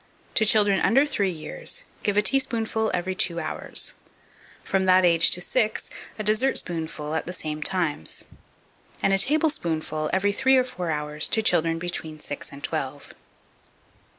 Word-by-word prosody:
To 220 - +3
children 205 -2 +4
under 270 +5 +4
three 200 -9 0
years, - - -3 0.2
give 205 -1 0
a 210 - +4
teaspoonful 225 -3 +1
every 185 +1 -1
two 170 -2 0
hours; 155 - -1 0.7
from 195 -1 0
that 185 0 +5
age 170 -1 +5
to 180 - 0
six, 220 +3 0 0.3
a 215 - -3
dessertspoonful 175 - -1
at 160 - -2
the 180 - -4
same 155 -3 -4
times; 165 - -1 0.8
and 195 - +3
a 195 - +4
tablespoonful 175 - 0
every 195 +2 +2
three 265 +5 +3
or 255 - +4
four 180 -9 -5
hours 150 0 0
to 220 - +1
children 165 -4 +2
between 165 -2 -4
six 145 - -6
and 140 0 -11
twelve. 145 -3 -4
185 Hz, 150 wpm, -25 LUFS, 160-220 Hz, 0.8 s, that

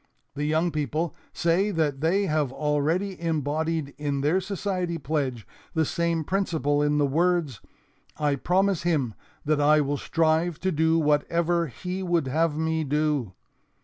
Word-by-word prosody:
The 145 +1 -3
young 160 +3 +1
people 155 +2 -2 0.2
say 175 +5 +1
that 155 -7 -1
they 190 +6 +2
have 150 -6 0
already 155 +7 -1
embodied 155 -1 -1
in 145 -2 -1
their 160 +7 +2
society 185 -3 -2
pledge 135 -6 -2 0.3
the 160 -1 +2
same 170 +1 0
principle 160 -5 0
in 150 0 +2
the 145 - +3
words, 160 -3 +1 0.6
'I 145 -2 +1
promise 190 +4 +1
Him 150 -9 0 0.3
that 150 0 +2
I 150 +1 +5
will 145 0 0
strive 160 +2 +1
to 190 - +1
do 160 0 +2
whatever 170 +3 +1
He 180 +8 -5
would 175 -5 +1
have 155 +3 0
me 160 0 0
do.' 145 -7 0
160 Hz, 145 wpm, -26 LUFS, 145-170 Hz, 0.6 s, I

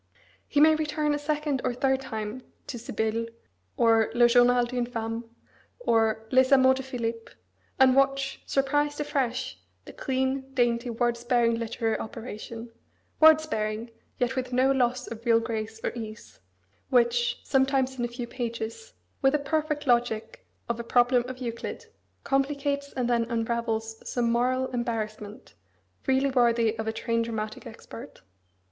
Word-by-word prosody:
He 285 - +1
may 315 +1 +7
return 305 -1 0
a 295 - -1
second 295 -2 -1
or 245 - -1
third 265 +1 +1
time 220 -1 -5 0.2
to 240 - -6
Sibylle, 225 0 -2 0.5
or 225 -1 +4
Le 240 0 +6
Journal 245 0 +5
d'une 245 0 -2
Femme, 225 -1 -4 0.5
or 225 - +1
Les 260 +1 +4
Amours 260 -1 +6
de - - -3
Philippe, 235 -3 -4 0.5
and 260 -1 +6
watch, 275 0 +1
surprised 290 +2 +1
afresh, 275 -4 -2 0.3
the - - -10
clean, 265 0 -2
dainty, 240 -1 +1
word 235 0 0
sparing 240 -1 +2
literary 230 -1 -1
operation 230 +1 -7 0.5
(word 315 0 +8
sparing, 220 -5 -3 0.3
yet 250 +1 0
with 255 -1 -3
no 260 +2 +3
loss 250 -1 +1
of 230 0 -8
real 230 -1 +4
grace 225 -1 -4
or - - 0
ease) 215 -3 -9 0.5
which, 240 -2 +2
sometimes 265 -1 +1
in - - 0
a - - +1
few 240 +1 -6
pages, 235 - -5 0.3
with 270 +1 +4
the - - +4
perfect 300 +1 -1
logic 240 - 0 0.2
of 235 0 -2
a - - -3
problem 245 +1 +3
of 255 - -6
Euclid, 235 -2 -5 0.4
complicates 280 +1 -1
and 250 -2 -1
then 235 -1 +2
unravels 225 -1 -2
some 235 -2 0
moral 255 +2 +1
embarrassment, 220 -3 -4 0.5
really 265 +1 +2
worthy 235 -3 +3
of 220 - -3
a - - +1
trained 230 +1 -1
dramatic 215 -2 -5
expert. 230 - -11
245 Hz, 150 wpm, -27 LUFS, 230-270 Hz, 0.5 s, word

